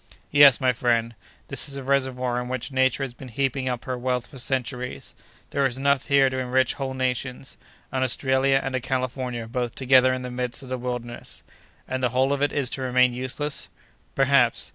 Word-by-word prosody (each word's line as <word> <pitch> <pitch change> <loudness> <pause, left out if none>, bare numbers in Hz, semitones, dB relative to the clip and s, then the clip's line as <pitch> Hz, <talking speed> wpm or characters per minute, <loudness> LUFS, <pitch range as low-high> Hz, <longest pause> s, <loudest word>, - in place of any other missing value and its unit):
"Yes, 145 -3 +7
my 130 -2 +2
friend, 115 -1 0 0.4
this - - 0
is 140 - -5
a 135 - -6
reservoir 130 -2 0
in 125 - -6
which 130 +2 -4
Nature 130 0 +2
has 130 -3 -5
been 130 +2 -11
heaping 130 +1 -1
up 125 -1 -4
her 130 - -2
wealth 125 -1 -1
for 135 - -12
centuries! 125 -1 -3 0.4
There 140 - +1
is 130 -2 +1
enough 140 0 +1
here 140 -1 +5
to 130 0 -2
enrich 130 0 +1
whole 135 -1 -4
nations! 130 +1 -3 0.4
An 130 - -1
Australia 130 +1 +2
and 135 -1 -2
a - - +1
California 125 -2 -3
both 120 0 -3
together 130 -1 +5
in 130 0 -3
the 125 - -5
midst 125 +1 -4
of 130 - -11
the 130 -1 -3
wilderness!" 120 -1 -5 0.4
"And 130 0 -3
the 125 - +2
whole 130 +3 +2
of 140 - -2
it 145 -1 +2
is 140 -4 -1
to 135 - -3
remain 125 -1 +3
useless!" 130 +4 -4 0.5
"Perhaps! 135 -3 +3
130 Hz, 200 wpm, -24 LUFS, 125-135 Hz, 0.5 s, Yes